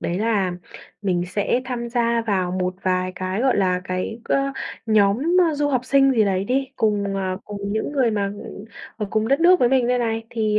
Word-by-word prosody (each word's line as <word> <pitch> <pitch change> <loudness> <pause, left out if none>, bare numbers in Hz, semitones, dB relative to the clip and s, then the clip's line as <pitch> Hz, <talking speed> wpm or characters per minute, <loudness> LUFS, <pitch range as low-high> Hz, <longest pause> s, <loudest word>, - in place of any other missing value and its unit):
đấy 175 +2 -2
là 205 -4 +1 0.5
mình 180 -3 0
sẽ 205 +6 0
tham 240 -1 -4
gia 235 -1 +1
vào 190 -4 0
một 185 0 -2
vài 185 0 0
cái, 185 +3 -3
gọi 260 -1 +2
là, 185 -2 +1
cái, 185 +5 -3
ơ, 275 0 0 0.3
nhóm, 210 -1 +3 0.3
a, - - -3
du 290 0 0
học 255 -3 0
sinh 270 +1 +4
gì 225 -4 +3
đấy 190 -1 0
đi, 265 +4 0
cùng, 205 -3 0
à, 190 -1 -2
cùng 200 0 -5
những 220 +6 -2
người 260 -5 +2
mà, 205 -2 0 0.2
ừm, 200 - -9 0.3
ở 215 -2 -3
cùng 220 0 0
đất 275 +3 +2
nước 360 +2 +5
với 245 - +4
mình 255 -2 +2
đây 250 0 +2
này. 225 -1 -1
Thì, 215 -2 0
215 Hz, 215 wpm, -22 LUFS, 195-245 Hz, 0.5 s, nước